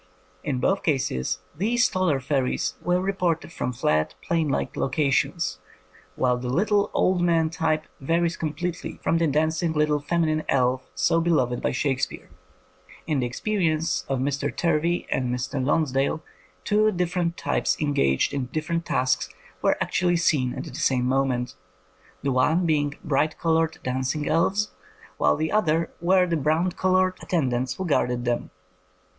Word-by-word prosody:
In 135 - -1
both 195 +8 +1
cases 130 - -1
these 235 +8 +2
taller 185 -7 +1
fairies 130 -9 -1
were 180 0 +1
reported 180 -4 -1
from 125 - -2
flat, 80 -10 0
plain 165 -2 0
like - - -2
locations; 140 - 0 0.6
while 125 -1 +2
the 125 0 -4
little 200 - +2
old 185 -1 +2
man 165 -2 +2
type 155 -1 0
varies 165 +4 +1
completely 165 +2 -4
from 165 - +2
the 165 - +2
dancing 160 +3 +1
little 150 -1 +2
feminine 155 +1 0
elf 130 0 +1
so 90 - +2
beloved 130 -8 +1
by - - 0
Shakespeare. 135 0 -2 0.7
In 155 -3 0
the 125 - 0
experience 165 - 0
of 135 - 0
Mr. 140 +2 -1
Turvey 170 +2 0
and 125 -1 0
Mr. 130 +2 -2
Lons 150 +1 +1
dale, 135 +4 0 0.4
two 215 +1 +3
different 175 -2 -1
types - - 0
engaged 70 - +1
in 135 -3 -2
different 165 +4 -3
tasks 125 -7 +1 0.3
were - - +2
actually 175 -1 +1
seen 140 -7 +1
at - - -4
the - - -9
same 125 -2 +1
moment, 130 -2 0 0.7
the 140 - +1
one 145 +8 +2
being 145 -3 +1
bright 150 +1 0
coloured 160 -1 +1
dancing 130 +4 -1
elves, 190 +6 +1 0.5
while 75 0 +4
the 160 - -2
other 165 -6 +1
were 185 +1 +4
the 170 -2 0
brown 155 +5 +1
coloured 185 0 +1
attendants 130 -6 -1
who 190 - -4
guarded 125 -6 0
them. 120 0 -1
155 Hz, 150 wpm, -25 LUFS, 130-170 Hz, 0.7 s, while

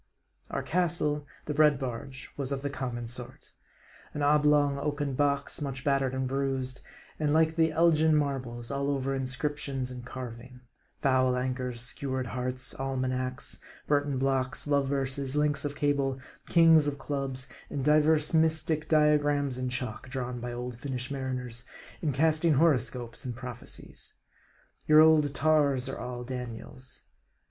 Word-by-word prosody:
Our - - -3
castle, 150 -4 +1 0.2
the 150 - -2
Bread 150 -1 +5
Barge 130 +1 -6
was 140 -1 -3
of 135 0 -3
the 140 - -2
common 125 -3 -4
sort; 125 +2 -7 0.6
an 145 - -1
oblong 145 -1 +4
oaken 145 -1 -2
box, 140 +2 0
much 135 -3 -4
battered 135 -2 +1
and 130 0 -1
bruised, 135 -1 -2 0.4
and 150 -1 +1
like 160 0 +3
the 160 -1 +3
Elgin 160 -1 +4
Marbles, 130 -5 -2
all 140 0 -1
over 135 -1 -1
inscriptions 135 0 -2
and 125 -1 -7
carving: 125 0 -8 0.4
foul 130 -2 +3
anchors, 125 -1 -2
skewered 130 +1 -2
hearts, 125 +1 -3
almanacs, 130 0 -2 0.3
Burton 145 -2 +1
blocks, 130 -1 0
love 140 -2 +2
verses, 135 0 0
links 150 -1 +2
of 145 0 -3
cable, 140 -2 +1 0.3
Kings 165 -3 +6
of 145 -1 -2
Clubs; 135 -2 -3 0.2
and 135 -2 -3
divers 150 +1 +4
mystic 160 -1 +2
diagrams 145 -3 +3
in 130 0 -1
chalk, 125 -1 -4
drawn 125 -2 -4
by 120 +1 -5
old 120 0 -5
Finnish 130 -1 -4
mariners, 125 -3 -3 0.4
in 155 - +1
casting 155 +3 +3
horoscopes 125 -6 +1
and 125 -2 -4
prophecies. 125 -1 -8 0.7
Your 155 0 +7
old 155 -2 +6
tars 145 -3 +3
are 135 - -5
all 125 0 -5
Daniels. 125 +1 -7
135 Hz, 140 wpm, -29 LUFS, 130-150 Hz, 0.7 s, Your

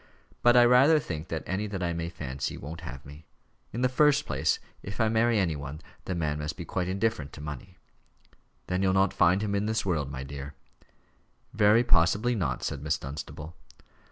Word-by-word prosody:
But 120 0 +6
I 120 - +8
rather 130 +6 +6
think 80 - -4
that 80 - -4
any 100 +3 -2
that 95 -3 -4
I 85 -1 0
may 85 0 -3
fancy 70 -5 -5
won't 80 +6 -8
have 65 -4 -8
me. 75 +2 -13 0.4
In 120 - -4
the 125 - +4
first 150 +3 +3
place, - - +1 0.2
if 100 +3 -8
I 110 -1 +3
marry 115 +1 +3
any 90 -6 +1
one, 70 +1 -7 0.3
the 95 - -2
man 75 -3 -1
must 75 0 -4
be - - -6
quite 90 -1 -2
indifferent 95 -7 -1
to - - -10
money." 75 +5 -8 0.9
"Then 90 +1 -1
you'll 95 -1 +2
not 95 +1 +3
find 90 +4 +3
him 100 -1 -1
in 100 +1 0
this 110 -1 0
world, 80 -7 0
my 65 -1 -5
dear." 70 +1 -8 1.0
"Very 110 +2 +5
possibly 105 +4 +3
not," 80 - -2
said 70 - -3
Miss 75 +1 0
Dunstable. 75 +3 -8
90 Hz, 195 wpm, -28 LUFS, 75-110 Hz, 1.0 s, I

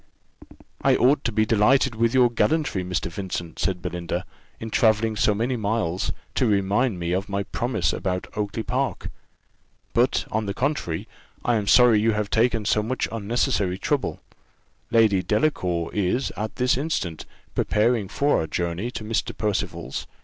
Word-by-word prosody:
"I - - +4
ought 135 +3 +3
to 120 - +1
be 110 0 +2
delighted 120 +5 +3
with 115 +2 +1
your 125 -2 +5
gallantry, 145 - +1
Mr. 90 -1 -2
Vincent," 90 -2 -5
said 90 -2 -1
Belinda, 90 +1 -3 0.3
"in 110 0 -6
travelling 110 -1 +3
so 105 0 +2
many 120 +5 0
miles, 105 -5 -1 0.2
to 125 - +1
remind 100 +2 +1
me 85 0 -2
of 95 +3 -1
my 100 0 -1
promise 115 -2 -1
about 90 -1 -2
Oakly 105 +1 -2
park; 130 -4 -2 0.8
but - - +2
on 110 -1 -1
the 100 - -3
contrary, 125 - -2 0.4
I 120 - +3
am 105 -2 -1
sorry 120 -3 +6
you 110 +1 +3
have 105 -1 -2
taken 115 -1 +2
so 105 - +2
much 120 +4 -2
unnecessary 110 -3 0
trouble: 140 +6 -1 0.7
Lady 110 -5 +4
Delacour 90 - 0
is, 105 +6 0
at 110 +1 -4
this 125 0 +2
instant, 130 - -3 0.3
preparing 110 -1 +1
for 145 +8 +1
our 80 - -2
journey 85 +7 -2
to 120 - -6
Mr. 110 +2 -2
Percival's. 100 - -3
110 Hz, 155 wpm, -24 LUFS, 95-120 Hz, 0.8 s, sorry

